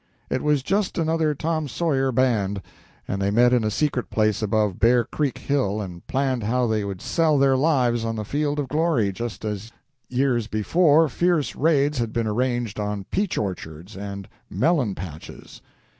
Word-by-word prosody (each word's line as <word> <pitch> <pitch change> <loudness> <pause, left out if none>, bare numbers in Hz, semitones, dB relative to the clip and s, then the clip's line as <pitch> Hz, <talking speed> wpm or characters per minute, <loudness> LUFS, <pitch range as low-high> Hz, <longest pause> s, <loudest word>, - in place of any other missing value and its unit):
It 130 - 0
was 150 -3 +1
just 195 +5 0
another 160 -2 +1
Tom 155 +1 -1
Sawyer 135 -2 0
band, 105 -6 +1 0.4
and 100 0 -2
they 100 - +1
met 120 +4 +4
in 120 -2 +3
a 110 - +1
secret 130 +2 -1
place 110 0 +1
above 105 -3 0
Bear 120 +2 +4
Creek 140 +4 -2
Hill 130 -8 0
and 90 -4 -7
planned 130 -2 0
how 125 +4 +1
they 110 -2 0
would 100 -2 -6
sell 160 -3 +2
their 135 -1 +4
lives 130 -5 +2
on 115 0 -2
the 105 -1 -4
field 145 +5 -1
of 145 -2 -1
glory, 150 -7 +1
just 115 +2 -6
as 105 +1 -4 0.4
years 125 -3 +1
before 155 - +3
fierce 170 +2 0
raids 145 -2 +2
had 115 -2 -2
been 115 -1 0
arranged 120 0 -1
on 105 -1 -3
peach 200 -1 -1
orchards 90 -1 -5
and 100 0 -6 0.2
melon 140 - +1
patches. 80 -4 -10
120 Hz, 175 wpm, -23 LUFS, 105-145 Hz, 0.4 s, met